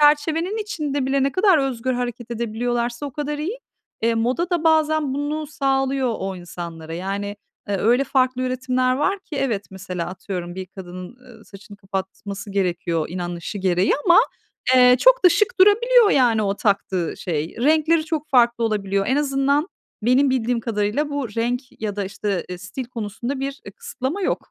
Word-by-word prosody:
çerçevenin 315 +6 +3
içinde 295 -10 -2
bile 270 0 +1
ne 275 - +1
kadar 375 -4 +4
özgür 260 -2 -1
hareket 245 -1 -4
edebiliyorlarsa 235 +3 -2
o - - -6
kadar 295 +1 -3
iyi. 375 +12 -3 0.4
Eee, 230 0 +2
moda 255 +10 0
da 345 -2 0
bazen 310 -3 +3
bunu 295 +2 -2
sağlıyor 270 -3 0
o 190 0 -4
insanlara. 170 -2 -7
Yani, 200 +3 -4 0.3
e, 200 - -1
öyle 240 +7 +3
farklı 255 -2 +1
üretimler 255 0 0
var 385 +8 +1
ki 335 -6 -9
evet 230 -8 -1
mesela 185 -2 -5
atıyorum 180 -1 -6
bir 190 0 -6
kadının, 185 +3 -9
ııı, 250 -2 -17
saçını 200 +1 -13
kapatması 195 +1 -6
gerekiyor, 175 -4 -1
inanışı 175 +2 -5
gereği 185 0 +2
ama, 345 -1 +7 0.6
eee, 250 0 +7
çok - - +5
da - - +10
şık 420 +7 +2
durabiliyor, 455 +2 +6
yani, 235 -5 +3
o 200 -1 0
taktığı 195 -4 0
şey. 160 -2 -3
Renkleri 310 +5 +3
çok 315 -1 -3
farklı 235 -3 +4
olabiliyor. 200 -3 0
En 260 - +2
azından, 280 +2 +1 0.3
benim 255 +4 +4
bildiğim 245 -2 0
kadarıyla 220 +6 -1
bu 285 -4 -2
renk 235 +4 -1 0.2
ya 205 -1 -2
da 200 - -1
işte, 195 -1 -3
ııı, 180 - -5
stil 190 +8 -6
konusunda 235 +3 -5
bir, 275 +1 -4
ııı, - - -8
kısıtlama 400 - -4
yok - - -2
245 Hz, 165 wpm, -22 LUFS, 200-290 Hz, 0.6 s, da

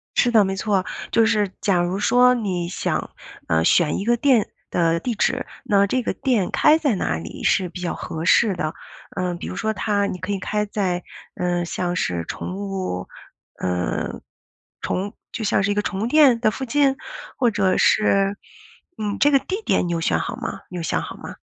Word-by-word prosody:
是 245 - +4
的， 220 -3 +6
没 190 0 -1
错， 195 -2 0 0.3
就 230 - +4
是 210 -3 +2
假 185 -4 +2
如 175 +2 -1
说 250 +3 +5
你 185 -7 -2
想 175 - -2 0.4
呃 80 0 +2
选 155 - +3
一 195 - -3
个 240 0 +3
店 250 -5 +3 0.2
的 170 -1 +1
地 235 +3 -3
址， - - 0 0.2
那 200 -1 +3
这 255 +3 0
个 - - -1
店 230 -9 0
开 305 +1 +5
在 280 -9 +1
哪 80 - -1
里 80 - -8
是 185 -2 +2
比 180 +1 -8
较 175 - -2
合 160 0 -5
适 200 +1 +4
的？ 155 -2 -2 0.4
呃 180 -2 -1
比 170 - -7
如 - - -5
说 220 +3 -1
它 205 0 0
你 185 - -4
可 185 +4 -4
以 195 - -1
开 210 +2 -1
在 185 -4 -2 0.3
呃 175 -1 0
像 175 +1 -2
是 90 - -1
宠 180 - -5
物 195 - -4 0.5
呃 90 -1 -2 0.6
宠 195 +3 -2 0.2
就 225 - -4
像 200 - +2
是 200 - +1
一 - - +2
个 210 - +1
宠 195 -1 -3
物 225 - 0
店 270 -4 +5
的 215 -2 +2
附 265 - -5
近， 275 +1 +2 0.4
或 245 -3 +3
者 195 -3 +1
是 195 -1 +3 0.6
嗯 210 -1 -2
这 290 - +5
个 275 - +5
地 390 +9 -4
点 175 - +2
你 - - -2
有 165 - -1
选 80 - +1
好 - - -3
吗？ - - -5
你 180 - -6
有 165 - -4
想 - - 0
好 - - -7
吗？ - - -9
200 Hz, 220 characters per minute, -22 LUFS, 180-225 Hz, 0.6 s, 的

